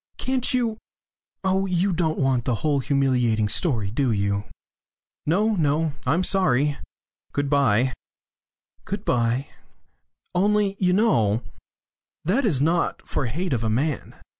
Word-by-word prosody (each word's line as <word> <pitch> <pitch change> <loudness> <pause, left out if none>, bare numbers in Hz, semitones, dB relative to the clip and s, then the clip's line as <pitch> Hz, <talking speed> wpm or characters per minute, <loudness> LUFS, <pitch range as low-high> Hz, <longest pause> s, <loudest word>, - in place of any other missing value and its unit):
Can't 260 0 0
you 235 -4 0 0.6
Oh, 190 +1 +1
you 185 +1 +1
don't 160 -2 0
want 130 -4 +1
the 125 - +1
whole 145 -2 +2
humiliating 125 -6 +1
story, 110 - -1
do 125 +2 +1
you?" 100 -1 0 0.8
"No, 210 +8 +2
no. 155 -2 +1
I'm 165 +8 +2
sorry. 150 -7 +2 0.6
Good 145 0 -1
bye." 130 -3 +3 0.9
"Good 200 +1 -5
bye." 120 +2 +1 0.9
"Only 200 +2 +2
you 180 -2 +2
know 115 - +2 0.8
that 230 - +2
is 160 - +2
not 165 +4 0
for 135 - -1
hate 165 +7 -2
of 115 -2 -1
a 110 - 0
man. 140 +7 -1
145 Hz, 130 wpm, -24 LUFS, 125-190 Hz, 0.9 s, bye